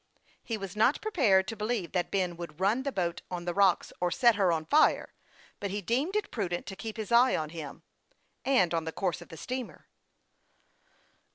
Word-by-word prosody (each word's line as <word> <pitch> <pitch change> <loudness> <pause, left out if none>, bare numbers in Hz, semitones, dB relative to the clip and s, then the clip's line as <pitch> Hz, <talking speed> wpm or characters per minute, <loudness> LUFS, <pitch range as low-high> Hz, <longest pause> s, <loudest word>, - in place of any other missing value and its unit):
He 225 - -3
was 195 -2 -7
not 220 +6 +3
prepared 230 - +3
to 225 - -4
believe 215 -3 -2
that 180 -2 -1
Ben 180 -3 0
would 170 -2 -8
run 205 +7 +2
the 280 +1 -2
boat 175 -6 -2
on 175 -1 -5
the 175 - -1
rocks, 195 -2 +3
or 180 - +1
set 235 +7 +4
her 195 -4 +2
on 160 -1 -1
fire; 305 - +3 0.5
but 200 - -3
he 200 +2 -2
deemed 260 - -1
it 425 -1 -1
prudent 180 -6 -2
to 195 - -7
keep 220 +2 -7
his 220 +1 -5
eye 245 +2 +5
on 155 -1 -3
him, 155 -4 -8 0.6
and 250 -10 +3
on 165 -1 0
the 160 - -3
course 175 -1 -2
of 175 - -12
the 165 - -10
steamer. 255 +6 -6
195 Hz, 200 wpm, -29 LUFS, 175-235 Hz, 0.6 s, eye